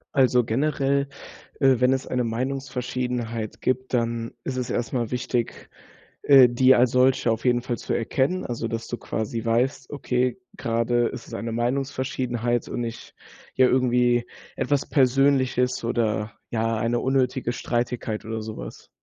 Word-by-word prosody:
Also 125 Hz, -3 st, +4 dB
generell, 140 Hz, +2 st, 0 dB, 0.5 s
äh, 135 Hz, -2 st, +5 dB
wenn 125 Hz, +1 st, +5 dB
es 135 Hz, 0 st, -1 dB
eine 125 Hz, -1 st, 0 dB
Meinungsverschiedenheit 125 Hz, -2 st, -3 dB
gibt, 130 Hz, 0 st, -1 dB
dann 115 Hz, -1 st, -1 dB
ist 130 Hz, -, -3 dB
es 125 Hz, -1 st, -3 dB
erst 120 Hz, +3 st, -2 dB
mal 120 Hz, -3 st, -1 dB
wichtig, 120 Hz, -1 st, -3 dB, 0.5 s
äh, 135 Hz, -3 st, +8 dB
die 130 Hz, +2 st, +5 dB
als 120 Hz, 0 st, +4 dB
solche 130 Hz, -1 st, +3 dB
auf 115 Hz, -, -2 dB
jeden 120 Hz, -1 st, +3 dB
Fall 120 Hz, -1 st, -3 dB
zu -, -, -4 dB
erkennen. 135 Hz, +9 st, 0 dB
Also, 115 Hz, -1 st, -3 dB
dass 115 Hz, 0 st, -4 dB
du -, -, -3 dB
quasi 110 Hz, +1 st, -4 dB
weißt, 125 Hz, +3 st, 0 dB
okay, 125 Hz, -2 st, -1 dB, 0.2 s
grade 115 Hz, +1 st, +1 dB
ist 115 Hz, -, -7 dB
es -, -, -12 dB
eine 115 Hz, 0 st, -4 dB
Meinungsverschiedenheit 125 Hz, -1 st, -1 dB
und -, -, -4 dB
nicht, 115 Hz, -1 st, -6 dB, 0.4 s
ja, 130 Hz, -, +5 dB
irgendwie 125 Hz, -1 st, +2 dB, 0.3 s
etwas 145 Hz, -2 st, 0 dB
Persönliches 130 Hz, -2 st, +2 dB
oder, 110 Hz, -2 st, 0 dB, 0.2 s
ja, 115 Hz, 0 st, 0 dB
eine 115 Hz, +2 st, 0 dB
unnötige 130 Hz, -2 st, 0 dB
Streitigkeit 120 Hz, -2 st, -2 dB
oder 110 Hz, 0 st, -4 dB
sowas. 110 Hz, 0 st, -8 dB
125 Hz, 150 wpm, -24 LUFS, 115-130 Hz, 0.5 s, äh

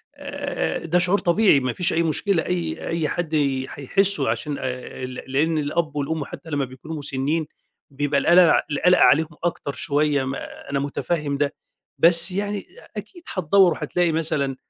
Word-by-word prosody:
آآ 285 Hz, -8 st, -4 dB
ده 175 Hz, +2 st, +2 dB
شعور 180 Hz, +3 st, +3 dB
طبيعي 175 Hz, -4 st, +4 dB
ما 130 Hz, -2 st, -2 dB
فيش 180 Hz, -, 0 dB
أي 170 Hz, -, +2 dB
مشكلة، 165 Hz, +2 st, 0 dB
أي 85 Hz, -3 st, -3 dB
أي 165 Hz, -2 st, -1 dB
حد 165 Hz, -3 st, -2 dB, 0.3 s
هيحسّه 195 Hz, -, +1 dB
عشان 140 Hz, +6 st, -2 dB
آآ 130 Hz, 0 st, -5 dB
ل 130 Hz, -, -7 dB
لإن 155 Hz, +4 st, +1 dB
الأب 150 Hz, +1 st, -1 dB
والأم 145 Hz, +1 st, -2 dB
حتّى 160 Hz, -, -10 dB
لمّا 145 Hz, -2 st, -1 dB
بيكونوا 135 Hz, +5 st, -8 dB
مُسنّين 145 Hz, +2 st, -2 dB, 0.4 s
بيبقى 140 Hz, 0 st, 0 dB
القَلَق 175 Hz, -1 st, +5 dB
القَلَق 180 Hz, +5 st, +3 dB
عليهم 160 Hz, +3 st, +5 dB, 0.2 s
أكتر 170 Hz, -4 st, -2 dB
شوية 145 Hz, -1 st, 0 dB
ما 135 Hz, +1 st, -7 dB
أنا 140 Hz, -1 st, 0 dB
مُتفهِّم 145 Hz, +1 st, -2 dB
ده. 145 Hz, 0 st, 0 dB, 0.4 s
بس 170 Hz, +2 st, +5 dB
يعني 205 Hz, +1 st, -3 dB, 0.3 s
أكيد 335 Hz, -, -9 dB
هتدوَّر 185 Hz, 0 st, +4 dB
وهتلاقي 175 Hz, 0 st, 0 dB
مثلًا 150 Hz, -4 st, -1 dB
155 Hz, 155 wpm, -23 LUFS, 140-175 Hz, 0.4 s, القَلَق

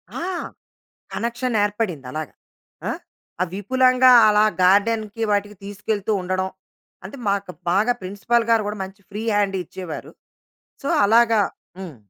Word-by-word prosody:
ఆ! -, -, -4 dB, 0.9 s
కనెక్షన్ 240 Hz, +1 st, -2 dB
ఏర్పడింది 205 Hz, -, -2 dB
అలాగా. 155 Hz, -1 st, -5 dB, 0.6 s
ఆ! -, -, 0 dB, 0.5 s
ఆ -, -, +5 dB
విపులంగా 255 Hz, +5 st, +4 dB, 0.2 s
అలా 210 Hz, 0 st, +4 dB, 0.2 s
గార్డెన్‌కి 215 Hz, +3 st, +2 dB
వాటికి 205 Hz, 0 st, 0 dB
తీసుకెళ్తూ 205 Hz, +1 st, -3 dB
ఉండడం. 185 Hz, +1 st, -1 dB, 0.6 s
అంటే 195 Hz, +9 st, -9 dB
మాకు 200 Hz, -2 st, -1 dB, 0.2 s
బాగా 210 Hz, +6 st, +3 dB
ప్రిన్సిపల్ 205 Hz, +5 st, 0 dB
గారు 225 Hz, -1 st, +4 dB
గూడా 210 Hz, 0 st, -4 dB
మంచి 195 Hz, +1 st, -11 dB
ఫ్రీ 210 Hz, +1 st, -5 dB
హ్యాండ్ 200 Hz, -1 st, +1 dB
ఇచ్చేవారు. 175 Hz, -1 st, -8 dB, 0.7 s
సో, 275 Hz, -, -3 dB, 0.2 s
అలాగా 225 Hz, +1 st, +4 dB, 0.4 s
హ్మ్. 180 Hz, -7 st, -8 dB
205 Hz, 125 wpm, -22 LUFS, 190-230 Hz, 0.9 s, ఆ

